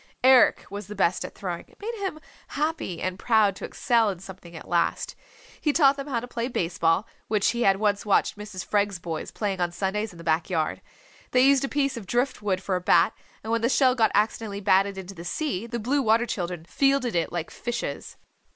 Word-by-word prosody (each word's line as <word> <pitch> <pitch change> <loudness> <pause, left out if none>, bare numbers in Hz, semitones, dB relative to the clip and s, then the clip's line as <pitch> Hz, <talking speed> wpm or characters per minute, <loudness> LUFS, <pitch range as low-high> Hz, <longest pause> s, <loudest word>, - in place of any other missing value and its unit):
Eric 255 -2 +6
was 200 -1 -6
the 210 - -7
best 185 -2 +1
at - - -8
throwing. 180 -4 -5
It - - -24
made 445 +3 -4
him 365 -5 -3 0.3
happy 300 - -2
and 185 +1 -3
proud 215 -4 +3
to - - -5
excel 230 -3 +2
in 190 - -3
something 180 -2 -12
at 160 - -10
last. 170 -1 0 0.5
He 300 - +2
taught 280 -2 +5
them 275 +1 -6
how 250 -5 -1
to 245 - -7
play 240 -1 -3
base 175 -9 -3
ball, 165 +5 +3 0.2
which 210 -2 +2
he 235 +1 -3
had 195 -4 +4
once 205 -1 +1
watched 205 - +2
Mrs. 210 -3 -7
Freg's 205 -2 +1
boys 165 -3 -5
playing 195 -4 -3
on 175 -1 +1
Sundays 200 +4 -2
in 175 - -14
the 165 - -10
back 160 +1 0
yard. 160 -4 -1 0.5
They 250 - +5
used 275 -1 +5
a 275 - -1
piece 275 -3 0
of 210 -5 -8
drift 245 +3 0
wood 190 -2 -1
for 190 - -1
a 180 - -1
bat, - - +4 0.3
and 220 - -4
when 230 0 +1
the 235 - +2
shell 260 -1 +4
got 225 -3 +3
accidentally 210 0 0
batted 195 0 +2
into 190 0 -7
the 170 -2 -9
sea 230 - -3
the 235 0 -3
Blue 260 +6 0
Water 230 0 +3
Children 175 -6 -4
fielded 275 +4 +1
it 170 - 0
like 170 -2 -4
fishes. 240 0 -5
210 Hz, 225 wpm, -26 LUFS, 185-245 Hz, 0.5 s, Eric